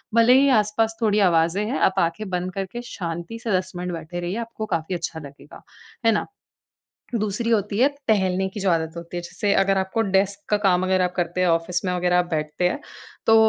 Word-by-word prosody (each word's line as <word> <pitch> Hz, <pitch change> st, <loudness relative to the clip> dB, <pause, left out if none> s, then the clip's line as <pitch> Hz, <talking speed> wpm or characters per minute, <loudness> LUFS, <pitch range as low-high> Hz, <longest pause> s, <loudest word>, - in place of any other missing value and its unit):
भले 230 Hz, +2 st, +6 dB
ही 280 Hz, -, +4 dB
आस-पास 220 Hz, +2 st, 0 dB
थोड़ी 210 Hz, -2 st, +3 dB
आवाजें 165 Hz, +4 st, +2 dB
हैं, 245 Hz, +6 st, -2 dB
आप 190 Hz, 0 st, +2 dB
आँखें 180 Hz, +5 st, -1 dB
बंद 180 Hz, 0 st, -2 dB
करके 195 Hz, +5 st, -4 dB
शांति 170 Hz, +4 st, -5 dB
से 230 Hz, -, -2 dB
10 185 Hz, 0 st, -4 dB
मिनट 180 Hz, 0 st, -3 dB
बैठे 165 Hz, +1 st, -6 dB
रहिए। 175 Hz, +2 st, -3 dB
आपको 220 Hz, -2 st, -6 dB
काफ़ी 165 Hz, +3 st, -3 dB
अच्छा 165 Hz, -1 st, -4 dB
लगेगा। 140 Hz, -2 st, -13 dB, 0.4 s
है 225 Hz, -, +6 dB
ना? 210 Hz, -, 0 dB, 1.0 s
दूसरी 215 Hz, +3 st, -1 dB
होती 205 Hz, -2 st, +1 dB
है, 260 Hz, +4 st, +5 dB, 0.2 s
टहलने 190 Hz, -3 st, +2 dB
की 205 Hz, -, -7 dB
जो 195 Hz, -1 st, +2 dB
आदत 160 Hz, -1 st, 0 dB
होती 170 Hz, +1 st, -7 dB
है, -, -, -1 dB
जैसे 200 Hz, +4 st, -1 dB
अगर 195 Hz, 0 st, +3 dB
आपको 190 Hz, +4 st, -1 dB
डेस्क 200 Hz, 0 st, +1 dB
का 210 Hz, -, +4 dB
काम 185 Hz, -3 st, +3 dB
अगर 185 Hz, 0 st, +2 dB
आप 180 Hz, 0 st, 0 dB
करते 175 Hz, 0 st, -1 dB
हैं, 185 Hz, -, +3 dB
ऑफिस 170 Hz, +2 st, 0 dB
में 180 Hz, -, 0 dB
वगैरह 180 Hz, 0 st, +2 dB
आप 180 Hz, -, +2 dB
बैठते 155 Hz, +2 st, 0 dB
हैं, 180 Hz, -, -3 dB, 0.5 s
तो 225 Hz, -, +6 dB
185 Hz, 215 wpm, -23 LUFS, 175-210 Hz, 1.0 s, भले